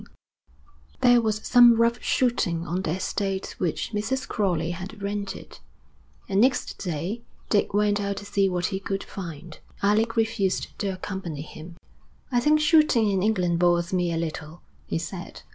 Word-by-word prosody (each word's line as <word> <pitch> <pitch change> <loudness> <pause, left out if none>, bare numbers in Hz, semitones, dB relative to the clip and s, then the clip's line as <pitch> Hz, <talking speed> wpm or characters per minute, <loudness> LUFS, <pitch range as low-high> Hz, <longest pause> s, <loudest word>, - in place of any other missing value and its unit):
IV - - -16 0.9
There 245 -1 +6
was 215 -1 -1
some 240 -2 +7
rough 230 +1 +2
shooting 180 -10 +1
on 175 +2 -2
the 165 -3 -1
estate 195 0 -3
which 175 +3 -2
Mrs. 260 +6 -2
Crowley 175 -6 0
had 190 +5 -7
rented, 200 0 -5 0.7
and 195 +1 +2
next 255 +1 +1
day 180 +6 -3 0.3
Dick 205 -1 +2
went 205 0 +2
out 200 -1 -2
to 205 - -7
see 200 -1 +1
what 180 -1 -1
he 190 -2 -2
could 195 0 -3
find. 170 -3 -8 0.2
Alec 220 +3 +2
refused 220 -4 0
to 205 - -1
accompany 185 -5 -5
him. 160 +2 -11 0.6
'I 245 - +3
think 300 +5 +4
shooting 300 -9 +4
in 190 -1 +1
England 180 -5 +1
bores 175 0 +2
me 175 -2 +1
a 165 - -1
little,' 160 0 -5 0.2
he - - -1
said. 175 +2 -7
195 Hz, 160 wpm, -25 LUFS, 175-220 Hz, 0.9 s, some